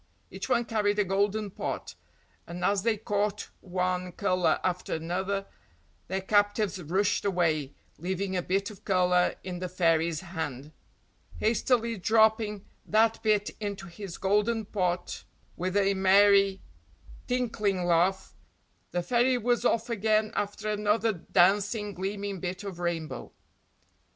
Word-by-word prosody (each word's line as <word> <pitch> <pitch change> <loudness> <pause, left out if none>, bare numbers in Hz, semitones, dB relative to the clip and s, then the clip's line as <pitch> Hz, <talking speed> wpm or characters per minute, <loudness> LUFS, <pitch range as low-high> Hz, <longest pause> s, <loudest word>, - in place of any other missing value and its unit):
Each - - -6
one 240 -2 +2
carried 210 -2 0
a 210 - +4
golden 200 +2 0
pot, - - -4 0.5
and 175 +1 -4
as 200 -1 +2
they 225 +1 +1
caught 205 0 -2
one 180 -1 -2
colour 185 -2 +1
after 180 -2 -1
another 190 +5 -2 0.6
their 190 +2 -2
captives 205 -1 +1
rushed 190 +5 0
away, 160 -7 0 0.2
leaving 190 +3 -2
a 180 - +1
bit 195 +4 -1
of 200 - -15
colour 180 -2 +2
in 180 -1 -5
the 185 0 -4
fairy's 165 -2 +1
hand. 160 -6 -5 0.7
Hastily 230 0 +1
dropping 220 0 +2 0.2
that 225 +1 +2
bit 210 -2 +1
into 200 -2 -4
his 190 0 -8
golden 210 +3 +1
pot 180 -3 -2 0.3
with 185 +3 -1
a 200 0 +3
merry, 195 0 +4 0.7
tinkling 215 -7 0
laugh, 175 +3 +1 0.6
the 175 0 -2
fairy 245 +4 +2
was 240 0 +1
off 230 -1 +1
again 215 -1 +1
after 205 +1 -3
another 210 +2 +1
dancing, 200 +4 +2
gleaming 195 +1 -4
bit 180 +2 -4
of 190 -4 -7
rainbow. 170 -3 -3
195 Hz, 130 wpm, -28 LUFS, 180-210 Hz, 0.7 s, a